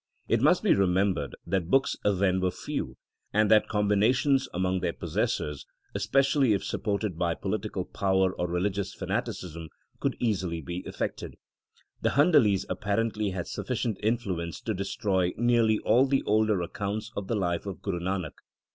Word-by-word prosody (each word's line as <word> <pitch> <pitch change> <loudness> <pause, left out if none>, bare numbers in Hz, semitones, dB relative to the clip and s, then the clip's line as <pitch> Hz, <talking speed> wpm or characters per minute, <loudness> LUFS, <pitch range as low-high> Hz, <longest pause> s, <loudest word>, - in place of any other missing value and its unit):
It - - +2
must - - +4
be - - +5
remembered 95 0 +1
that 95 -4 -1
books 135 +4 +3
then 95 -2 +2
were 95 - +2
few, - - -5 0.3
and 105 0 +3
that 110 -1 +5
combinations 115 +6 +2
among 95 +1 0
their 90 -2 -1
possessors, 75 -1 -2 0.3
especially 135 -3 +2
if 100 - -1
supported 100 -4 -2
by 85 -2 +1
political 100 -2 -3
power 95 -1 +1
or 90 - -2
religious 95 +3 -2
fanaticism, 85 -2 -4 0.3
could - - -1
easily 95 -8 -1
be 85 +1 -5
effected. - - -4 0.7
The - - +1
Handalis 130 - +4
appar 100 0 -2
ently 110 -3 0
had 90 - -3
sufficient 110 -5 -3
influence 100 -7 -1
to 110 - -2
destroy 95 -2 0
nearly 115 -2 +3
all 130 +5 +3
the 135 0 +1
older 105 -3 +2
accounts 105 +5 -4
of 100 -2 -4
the 115 - 0
life 90 -1 -1
of 95 -5 -6
Guru 95 -4 -2
Nanak. 90 -3 -2
100 Hz, 155 wpm, -28 LUFS, 90-110 Hz, 0.7 s, be